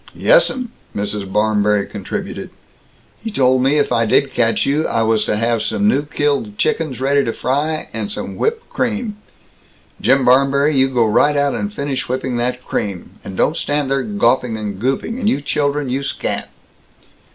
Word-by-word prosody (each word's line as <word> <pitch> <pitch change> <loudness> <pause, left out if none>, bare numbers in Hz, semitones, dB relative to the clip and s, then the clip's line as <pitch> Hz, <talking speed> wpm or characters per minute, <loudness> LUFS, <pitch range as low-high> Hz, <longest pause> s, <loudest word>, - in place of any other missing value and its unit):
"Yessum," - - +3 0.3
Mrs. 100 -1 -3
Barmberry 105 -1 +2
contributed, - - -5 0.7
"he 225 - -3
told 130 -9 +2
me 135 +3 +3
if 145 - +1
I 115 -2 +2
did 135 +4 +2
catch 115 -2 +1
you, 150 +3 +1
I 115 - +1
was 110 -1 +2
to - - 0
have 115 0 +1
some 205 - 0
new 145 -9 +2
killed 140 -8 -1
chickens 155 -4 -1
ready 140 +1 +2
to 115 - -1
fry, 150 +6 -1
and 205 - -4
some - - -5
whipped 455 +1 -1
cream 220 -2 -2 0.8
Jim 135 -1 +3
Barmberry, 140 +3 +4
you 135 0 +3
go 120 -3 +2
right 145 +7 +3
out 140 -1 +2
and 205 - -3
finish 140 -9 -3
whipping 130 -1 -2
that 125 +1 -2
cream, 100 -4 -4
and 95 - -8
don't 155 - +2
stand 145 -4 -1
there 135 0 +2
gawping 130 - +1
and 105 -3 -5
gooping, 135 - -1
and 215 -4 +1
you 135 - +1
children, 145 0 -1
you 130 +2 -1
scat!" 135 - -3
135 Hz, 175 wpm, -18 LUFS, 115-150 Hz, 0.8 s, Barmberry